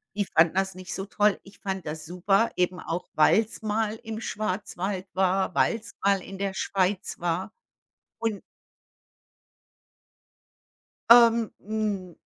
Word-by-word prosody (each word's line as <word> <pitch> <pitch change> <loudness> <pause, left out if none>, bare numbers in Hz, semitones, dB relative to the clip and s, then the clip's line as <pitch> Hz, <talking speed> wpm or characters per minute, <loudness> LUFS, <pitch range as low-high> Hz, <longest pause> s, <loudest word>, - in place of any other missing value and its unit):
die 205 -1 0
fanden 165 -1 +3
das 190 0 0
nicht 185 0 -7
so 190 - -4
toll. 210 0 +2
Ich 195 - -17
fand 190 -2 -4
das 155 +1 -5
super, 195 +5 +2
eben 180 0 0
auch 175 +1 -4
weil's 215 +8 +3
mal 215 0 -1
im 220 -1 -6
Schwarzwald 195 -2 -3
war, 190 0 +1
weil's 230 0 0
mal 200 0 +3
in 195 +1 -9
der 195 -1 -1
Schweiz 190 0 -1
war 175 +2 -2 0.7
und 225 -3 -2 2.7
Ähm, 235 -2 +7
hm, 205 -4 -3
195 Hz, 125 wpm, -26 LUFS, 185-215 Hz, 2.7 s, Ähm